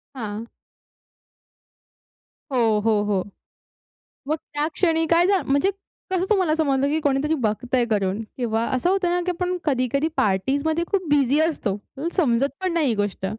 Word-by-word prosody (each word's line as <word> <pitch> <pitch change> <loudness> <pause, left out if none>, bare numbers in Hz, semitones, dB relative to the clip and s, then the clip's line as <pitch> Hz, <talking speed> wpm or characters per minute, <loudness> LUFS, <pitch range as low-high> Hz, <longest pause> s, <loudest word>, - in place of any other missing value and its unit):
हां. 220 -2 -5 2.1
हो, 225 -4 +2
हो, 215 -2 +3
हो. 200 -3 0 1.0
मग 310 - +1 0.2
त्या 295 +1 0
क्षणी 325 -3 +2
काय 335 +2 +4
झा 390 -2 +3
म्हणजे 285 +8 +2 0.4
कसं 370 -1 +1
तुम्हाला 370 -7 +2
समजलं, 280 -3 +1
की 310 +2 +1
कोणीतरी 285 +1 +1
बघतंय 245 +3 0
करून 205 -1 0 0.2
किंवा 230 -2 0
असं 255 +8 +1
होतं 380 -2 +1
ना, 355 - +1
की 360 - +1
आपण 360 +1 -2
कधी-कधी 275 +1 +1
पार्टीजमध्ये 280 - +1
खूप 375 -4 0
बिझी 285 0 +3
असतो. 315 -11 0
आपल्याला 275 - -7
समजत 275 -5 +2
पण 370 -2 -1
नाही 320 -5 +2
ही 230 - +1
गोष्ट. 205 -2 -2
280 Hz, 150 wpm, -23 LUFS, 230-335 Hz, 2.1 s, काय